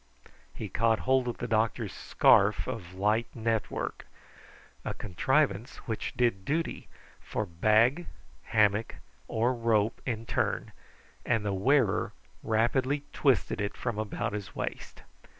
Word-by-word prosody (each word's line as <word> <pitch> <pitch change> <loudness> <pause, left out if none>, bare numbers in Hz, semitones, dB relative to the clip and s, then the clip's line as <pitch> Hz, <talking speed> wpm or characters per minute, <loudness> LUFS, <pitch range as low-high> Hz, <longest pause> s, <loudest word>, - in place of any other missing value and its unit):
He - - -6
caught 115 -1 +1
hold 130 -1 +2
of 120 - -3
the 125 - -4
doctor's 110 -1 0
scarf - - +4
of 90 +1 -6
light 105 +4 +1
network, 115 -2 -2 0.8
a - - -4
contrivance 115 - 0
which 110 -2 -3
did 115 -6 +1
duty 160 +9 -2 0.3
for 110 - -3
bag, 110 - +3 0.4
hammock, 110 -2 +2 0.3
or 120 +3 +1
rope 115 -3 +1
in 115 -2 -3
turn, - - -1 0.5
and 115 -4 0
the 100 - 0
wearer 120 +1 +2 0.3
rapidly 130 +6 +1
twisted 135 -6 +2
it 100 - -3
from 120 -4 -3
about 110 -1 -2
his 105 -2 -6
waist. - - -5
115 Hz, 125 wpm, -29 LUFS, 105-125 Hz, 0.8 s, scarf